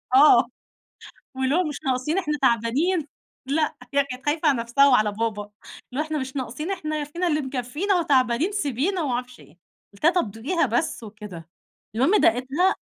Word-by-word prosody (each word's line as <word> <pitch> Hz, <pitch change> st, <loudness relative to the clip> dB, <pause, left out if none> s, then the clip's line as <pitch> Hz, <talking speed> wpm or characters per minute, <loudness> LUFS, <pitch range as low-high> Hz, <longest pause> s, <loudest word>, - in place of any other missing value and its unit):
آه، 290 Hz, +3 st, +7 dB, 0.9 s
واللي 265 Hz, +2 st, 0 dB
هو 360 Hz, +1 st, +2 dB
مش 295 Hz, -2 st, -4 dB
ناقصين 265 Hz, +7 st, 0 dB
إحنا 300 Hz, -5 st, -1 dB
تعبانين، 270 Hz, -, +1 dB, 0.4 s
لأ، 305 Hz, +2 st, 0 dB, 0.2 s
هي 280 Hz, -1 st, +4 dB
كانت 255 Hz, +1 st, -9 dB
خايفة 305 Hz, +1 st, +1 dB
على 270 Hz, -4 st, +2 dB
نفْسها 240 Hz, +5 st, +4 dB
وعلى 215 Hz, -5 st, +3 dB
بابا، 210 Hz, -1 st, -3 dB, 0.4 s
اللي 275 Hz, -, -2 dB
هو -, -, -6 dB
"إحنا 310 Hz, -1 st, -2 dB
مش 265 Hz, +1 st, -5 dB
ناقصين، 270 Hz, +7 st, -4 dB
إحنا 310 Hz, -5 st, -3 dB
ي -, -, -2 dB
فينا 340 Hz, +5 st, -3 dB
اللي 305 Hz, -1 st, +1 dB
مكفّينا 270 Hz, +9 st, -2 dB
وتعبانين، 275 Hz, +3 st, +2 dB
سيبينا." 345 Hz, -, -1 dB
ومعرفش 250 Hz, -2 st, -3 dB
إيه، 160 Hz, +5 st, -19 dB, 0.3 s
قُلت 200 Hz, -, -15 dB
لها 340 Hz, -, +6 dB
طَب 345 Hz, -, 0 dB
دوقيها 280 Hz, -, -1 dB
بس 240 Hz, +3 st, -1 dB
وكده، 205 Hz, -6 st, -10 dB, 0.5 s
المهم 330 Hz, -, +3 dB
داقتها 270 Hz, -, +2 dB
275 Hz, 170 wpm, -24 LUFS, 240-315 Hz, 0.9 s, آه